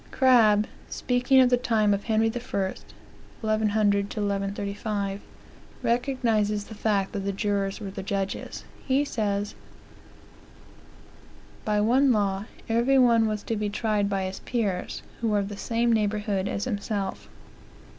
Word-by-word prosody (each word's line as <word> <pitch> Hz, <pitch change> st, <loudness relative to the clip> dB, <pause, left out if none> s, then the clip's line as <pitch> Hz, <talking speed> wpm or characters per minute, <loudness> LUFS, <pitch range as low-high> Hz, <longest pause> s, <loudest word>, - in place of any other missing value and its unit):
Crabbe, 225 Hz, -5 st, +5 dB, 0.2 s
speaking 250 Hz, +1 st, +2 dB
of 255 Hz, -1 st, +4 dB
the 245 Hz, -, +5 dB
time 220 Hz, -4 st, +2 dB
of 200 Hz, 0 st, -3 dB
Henry 220 Hz, -1 st, +2 dB
I., 245 Hz, -3 st, -4 dB
(1100 205 Hz, +1 st, -1 dB
to -, -, -5 dB
1135,) 200 Hz, 0 st, -2 dB, 0.6 s
recognizes 230 Hz, -4 st, +1 dB
the 220 Hz, -, -11 dB
fact 205 Hz, -2 st, 0 dB
that 205 Hz, -, -3 dB
the 200 Hz, 0 st, -2 dB
jurors 200 Hz, 0 st, -1 dB
were 200 Hz, -3 st, -6 dB
the 195 Hz, -, -6 dB
judges. 195 Hz, 0 st, -3 dB, 0.2 s
He 275 Hz, +2 st, +2 dB
says: 205 Hz, -5 st, -2 dB, 2.1 s
"By 210 Hz, -1 st, +1 dB
one 255 Hz, +5 st, +4 dB
law, 200 Hz, -2 st, 0 dB, 0.2 s
every 235 Hz, +4 st, +3 dB
one 235 Hz, -3 st, +5 dB
was 215 Hz, -1 st, -3 dB
to 225 Hz, -, -2 dB
be 210 Hz, -1 st, -1 dB
tried 210 Hz, -1 st, 0 dB
by 195 Hz, -1 st, -1 dB
his 190 Hz, 0 st, -4 dB
peers, 205 Hz, -7 st, -2 dB, 0.2 s
who 230 Hz, -, -1 dB
were 210 Hz, -1 st, +2 dB
of 200 Hz, -1 st, -1 dB
the 205 Hz, -, -6 dB
same 230 Hz, +3 st, +1 dB
neighborhood 210 Hz, -2 st, 0 dB
as 200 Hz, -, -2 dB
himself. 205 Hz, -4 st, -3 dB
210 Hz, 140 wpm, -26 LUFS, 200-230 Hz, 2.1 s, Crabbe